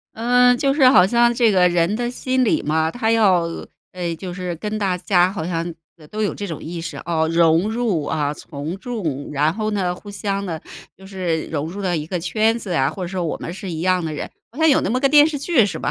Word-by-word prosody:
呃， 245 +2 +4
就 275 +2 +1
是 275 -3 +6
好 180 -7 +6
像 235 +3 +3
这 235 -1 +3
个 180 -3 +4
人 175 +3 +1
的 240 +1 -2
心 255 +1 0
理 225 - +1
嘛， 160 +1 0
他 225 +1 -1
要 200 -6 +4 0.5
呃， 175 -2 -3
就 185 0 -6
是 180 -1 -4
跟 210 +5 -4
大 190 -3 0
家 180 0 +2
好 185 -5 -4
像， 165 -2 -2 0.3
呃， 155 -3 -16
都 215 - -6
有 205 - -1
这 205 - -5
种 165 -6 -6
意 170 +1 -6
识， 170 - -6
哦， 160 -2 +1
融 165 +4 +3
入 220 -9 -1
啊、 145 0 -1
从 150 +5 -7
众， 190 - -4
然 150 +2 +1
后 215 0 -2
呢， 185 -4 -1
互 205 +3 -11
相 200 0 -3
呢 165 -4 -4 0.4
就 190 - -13
是 180 -5 -2
融 150 -1 -3
入 190 +5 -7
到 180 -2 0
一 155 -2 -3
个 180 +1 -3
圈 220 +6 +1
子 205 -5 -6
呀， 135 -3 +2
或 190 - -7
者 175 - -3
说 185 -1 -3
我 160 - -3
们 170 - -6
是 190 0 -7
一 160 -2 -4
样 185 0 +1
的 160 - -3
人。 150 - -5 0.2
好 - - -11
像 320 0 +4
有 280 - +4
那 - - -1
么 250 +2 0
个 275 - +3
电 295 +1 +7
视 310 -2 -3
剧 285 -4 +3
是 180 -6 -3
吧？ - - -2
185 Hz, 270 characters per minute, -21 LUFS, 165-225 Hz, 0.5 s, 电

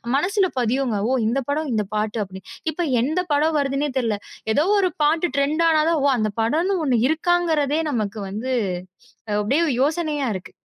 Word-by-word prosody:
மனசுல 380 +6 +2
பதியுங்க. 240 -2 0
"ஓ! - - +2
இந்தப் 265 +2 -1
படம், 300 0 -1
இந்தப் 210 -2 -2
பாட்டு." 215 +1 -1
அப்படீன்னு. 190 -1 -11 0.2
இப்ப 345 +3 -2 0.2
எந்தப் 325 +4 -1
படம் 310 +2 +2
வருதுன்னே 280 +1 0
தெர்ல. 225 -4 0 0.4
எதோ 300 +7 +2
ஒரு 370 -3 +2
பாட்டு 320 +4 +2
டிரெண்ட் 300 +4 +1
ஆனாதான், 315 0 +3
ஒ! - - +5
அந்தப் 215 -1 -2
படம்ன்னு 335 - +1
ஒண்ணு 245 -4 +2
இருக்காங்கறதே 320 -3 +1
நமக்கு 215 -3 -2
வந்து, 240 +6 -3 0.9
அப்படியே 270 +11 +1 0.2
யோசனையா 300 -2 0
இருக்கு. 185 - -8
285 Hz, 160 wpm, -22 LUFS, 230-320 Hz, 0.9 s, ஒ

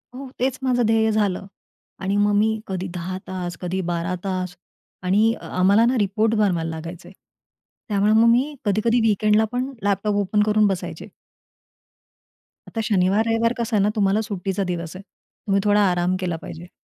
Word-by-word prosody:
हो 265 0 -8
तेच 255 0 0
माझं 245 -2 +2
ध्येय 220 0 +3
झालं 200 -3 0 0.6
आणि 195 +1 0
मग 205 0 +3
मी 220 +1 +2
कधी 190 -1 -3
10 180 +2 -4
तास, 180 -2 -5
कधी 185 +1 -2
12 170 +2 -2
तास. 185 -2 -3 0.5
आणि 210 +5 +3
आम्हाला 200 +5 +3
ना 250 +1 +2
रिपोर्ट 215 +2 +1
बनवायला 180 -6 +1
लागायचे. 165 +2 -8 0.8
त्यामुळे 205 +1 +2
मग 225 +1 +5
मी 265 +6 +2
कधी-कधी 220 +4 +2
वीकेंडलापण 220 +4 +1
लॅपटॉप 205 +1 0
ओपन 205 +1 +1
करून 215 0 +3
बसायचे. 190 -2 -4 1.6
आता 225 - -4
शनिवार, 200 0 +2
रविवार 230 +1 +2
कसं 230 -1 -1
आहे 200 - +3
ना. 205 - +3
तुम्हाला 205 +1 +2
सुट्टीचा 195 -2 -3
दिवस 175 -2 -4
आहे. 190 - -9 0.4
तुम्ही 195 0 +2
थोडा 205 0 +4
आराम 180 +1 0
केला 180 -3 -2
पाहिजे. 175 +2 -9
205 Hz, 155 wpm, -22 LUFS, 185-220 Hz, 1.6 s, मग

